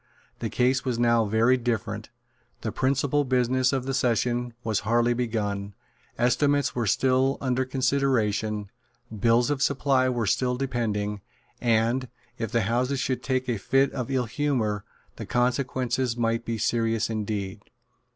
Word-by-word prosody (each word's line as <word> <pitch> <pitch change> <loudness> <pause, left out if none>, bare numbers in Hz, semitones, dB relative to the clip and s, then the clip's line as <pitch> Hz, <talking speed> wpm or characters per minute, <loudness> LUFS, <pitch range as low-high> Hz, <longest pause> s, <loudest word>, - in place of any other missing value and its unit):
The - - -3
case 125 +1 +1
was 125 -3 -1
now 115 -1 +3
very 115 +5 +3
different. 110 -3 -3 0.5
The 110 - -3
principal 135 +3 +1
business 130 0 +2
of 135 -2 -1
the 135 - -2
session 120 -1 0
was 110 -3 0
hardly 120 +3 +2
begun: 105 -4 -2 0.4
estimates 140 +4 +2
were 120 -3 -1
still 130 +4 +2
under 130 -1 0
consideration: 115 -6 0 0.4
bills 115 +5 +3
of 140 -2 -1
supply 135 -2 +2
were 120 -3 -1
still 125 +6 +1
depending; 105 -6 -2 0.4
and, 120 +2 +2 0.3
if 115 - -3
the 120 -1 +2
Houses 125 +5 0
should 130 0 -1
take 130 -1 -1
a 120 -4 -1
fit 135 +7 +2
of 125 -2 -4
ill 130 -2 0
humour, 115 -5 -1 0.3
the - - -7
consequences 125 0 0
might 115 0 0
be 115 -1 -2
serious 115 0 +1
indeed. 105 -2 -3
120 Hz, 140 wpm, -26 LUFS, 110-130 Hz, 0.5 s, now